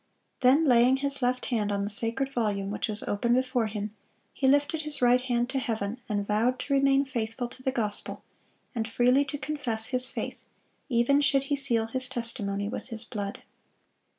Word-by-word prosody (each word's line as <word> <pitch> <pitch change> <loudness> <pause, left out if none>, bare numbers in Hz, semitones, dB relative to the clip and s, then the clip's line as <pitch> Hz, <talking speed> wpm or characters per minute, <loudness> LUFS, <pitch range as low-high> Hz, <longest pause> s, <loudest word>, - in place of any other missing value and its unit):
Then, 265 +5 +5
laying 250 -2 +5
his 280 0 -1
left 250 0 0
hand 215 -5 0
on 200 0 0
the 200 - -2
Sacred 235 +6 -1
Volume, 205 -5 -1
which 210 - -2
was 215 -1 -3
open 235 +4 +1
before 255 -3 +1
him, 210 0 -5 0.4
he 265 - 0
lifted 290 +3 +3
his 300 -2 -3
right 245 0 +4
hand 245 -1 0
to 270 - 0
heaven, 225 -2 -3
and 205 -1 -1
vowed 225 +5 +1
"to 280 - -2
remain 275 0 +4
faithful 240 -1 -3
to 255 - -12
the 265 - 0
gospel, 215 -6 -3 0.5
and 225 -3 -2
freely 250 +4 +3
to 285 +1 -4
confess 270 -6 -3
his 255 -1 +1
faith, - - -5 0.5
even 250 +4 +3
should 275 -1 +3
he - - +4
seal 245 -5 +2
his 255 +3 -3
testimony 210 -5 -2
with 220 - -5
his 230 -2 -7
blood." 205 -3 -5
245 Hz, 185 wpm, -28 LUFS, 220-270 Hz, 0.5 s, Then